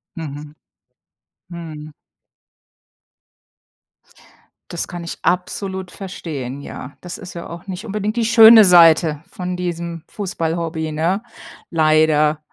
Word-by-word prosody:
Mhm, 150 -3 -7 1.0
mhm. 155 -3 -9 2.8
Das 170 - -4
kann 175 -1 -7
ich 170 - -6
absolut 190 +1 -2
verstehen, 150 -9 -6
ja. 140 0 -9
Das 180 0 -7
ist 185 -3 -10
ja 170 - -7
auch 170 +3 -10
nicht 190 +3 -6
unbedingt 210 +1 -3
die 230 - +1
schöne 225 -1 +8
Seite 165 -4 +5
von 180 0 -5
diesem 170 -2 -4
Fußball-Hobby, 165 -5 -3
ne, 170 +7 -1 0.5
leider. 155 -1 +3
170 Hz, 105 wpm, -19 LUFS, 155-190 Hz, 2.8 s, schöne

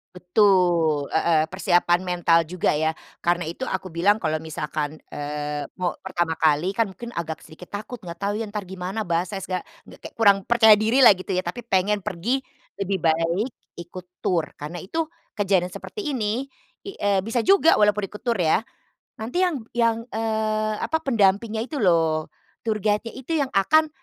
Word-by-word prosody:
Betul. 180 -6 +2
Heeh. 160 -1 +3
Persiapan 175 -1 +2
mental 175 -2 +3
juga 180 0 0
ya 155 +1 +1 0.3
karena 175 0 +1
itu 170 +10 -5
aku 190 -1 -4
bilang 185 +6 +3
kalau 155 0 0
misalkan, 155 -1 -4 0.2
eee, 145 0 -4
mau 180 -1 +1
pertama 170 -2 -1
kali 160 +4 +3
kan 225 +1 +1
mungkin 235 +5 -9
agak 160 -4 -5
sedikit 165 +3 -13
takut, 220 +3 -7
enggak 170 -1 -8
tahu 200 +1 0
ya 225 - -2
entar 210 0 -4
gimana, 190 +3 -4
bahasa 175 +3 -1
esga 185 -1 -3 0.2
g - - -15
kayak - - -11
kurang 200 -3 +5
percaya 225 -2 +7
dirilah, 230 +2 +6
gitu 185 +1 -6
ya, 185 - 0
tapi 180 +8 -5
pengen 200 0 +1
pergi. 200 +10 -1 0.4
Lebih 195 -1 -1
baik 165 +8 +1 0.3
ikut 180 +1 -10 0.2
tur 165 -4 +1
karena 150 +4 -6
itu 320 - -2 0.3
kejadian 185 -3 +1
seperti 425 - -7
ini 230 +2 -1 0.4
i 395 - -5
eee, 200 -1 +1
bisa 230 +2 0
juga 390 -4 +5
walaupun 210 -1 +3
ikut 210 - -11
tur 235 -3 +1
ya, 175 +3 +2 0.6
nanti 235 +11 -2
yang 355 - +1 0.2
yang, 230 -1 +3 0.2
eee, 215 -1 0
apa, 320 - 0
pendampingnya 220 -3 +2
itu 300 - -6
loh, 165 -3 +2 0.4
tour 220 -2 0
guide-nya 210 +2 0
itu 265 +5 -6
yang 270 - -3
akan 310 +11 +4
190 Hz, 170 wpm, -24 LUFS, 170-220 Hz, 0.6 s, percaya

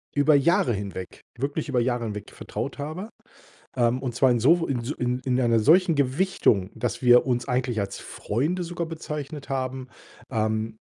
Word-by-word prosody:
über 145 +1 +5
Jahre 140 -3 +3
hinweg, 95 -2 -6 0.2
wirklich 145 +4 -3
über 130 -3 +1
Jahre 120 -1 0
hinweg 105 -2 -6
vertraut - - -6
habe. 160 +9 -5 0.7
Ähm, 120 +1 +2
und 125 -3 -3
zwar 130 +2 +4
in 120 -1 +2
so 165 +9 +5
w 165 - -1
in 125 - -2
s 120 +3 -5 0.4
in 130 0 +2
einer 115 -2 +3
solchen 170 - +5
Gewichtung, 135 - +1
dass 125 - -3
wir 125 -1 +6
uns 125 -2 0
eigentlich 125 -3 0
als 100 -1 -4
Freunde 150 - -2
sogar 170 0 -4
bezeichnet 150 -3 -6
haben, 130 -1 -3 0.4
ähm. 110 -1 -1
130 Hz, 170 wpm, -25 LUFS, 120-150 Hz, 0.7 s, wir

